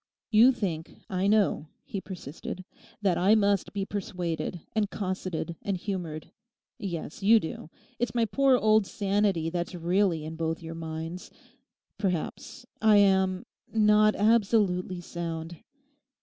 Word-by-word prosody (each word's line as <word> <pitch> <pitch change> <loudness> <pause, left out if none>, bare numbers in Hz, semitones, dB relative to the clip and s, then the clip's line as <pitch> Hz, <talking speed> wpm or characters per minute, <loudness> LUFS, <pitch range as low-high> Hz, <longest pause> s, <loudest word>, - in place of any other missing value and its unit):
'You 230 +4 +7
think, 175 -9 -4 0.2
I 185 +1 +1
know,' 205 -7 +2 0.2
he 195 - -5
persisted, 180 0 -7 0.4
'that 185 -4 +2
I 195 +5 +5
must 200 -3 +2
be 200 -1 -2
persuaded 180 -4 -4
and 215 -2 +1
cosseted 185 -4 -3
and 195 -2 -2
humoured. 175 -5 -5 0.5
Yes, 170 -5 -5
you 220 +3 +6
do; 160 -3 -7 0.3
it's 240 +1 -1
my 230 -1 +3
poor 270 +3 +3
old 215 -3 +3
sanity 195 -5 0
that's 175 +1 -3
really 175 -1 +1
in 160 +1 -6
both 165 0 -2
your 165 0 -6
minds. 165 +2 -6 0.7
Perhaps 195 +5 -3 0.2
I 215 -1 +6
am—not 205 +2 +3
absolutely 200 -5 +2
sound. 170 -1 -5
190 Hz, 125 wpm, -28 LUFS, 170-210 Hz, 0.7 s, You